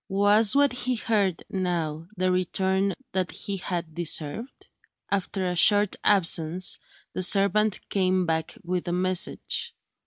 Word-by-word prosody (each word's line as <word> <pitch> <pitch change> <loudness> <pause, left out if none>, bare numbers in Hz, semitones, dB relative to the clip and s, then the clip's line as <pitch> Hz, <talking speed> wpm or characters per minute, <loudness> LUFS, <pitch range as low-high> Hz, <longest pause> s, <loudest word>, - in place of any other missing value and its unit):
Was 205 +4 +4
what 285 0 +4
he 250 0 -2
heard, 205 -6 -1
now, 165 -4 -3
the 185 0 +1
return 190 +2 0 0.2
that 185 -1 -1
he 200 -1 -5
had 175 -3 -4
deserved? 170 - -3 0.4
After 195 -1 -2
a 180 0 -2
short 205 +3 +5
absence, 180 -2 +2 0.3
the - - -3
servant 200 +2 +3
came 185 -2 +1
back 160 -1 -2
with 180 0 -3
a 175 - -1
message. 185 - -1
185 Hz, 130 wpm, -25 LUFS, 175-205 Hz, 0.4 s, short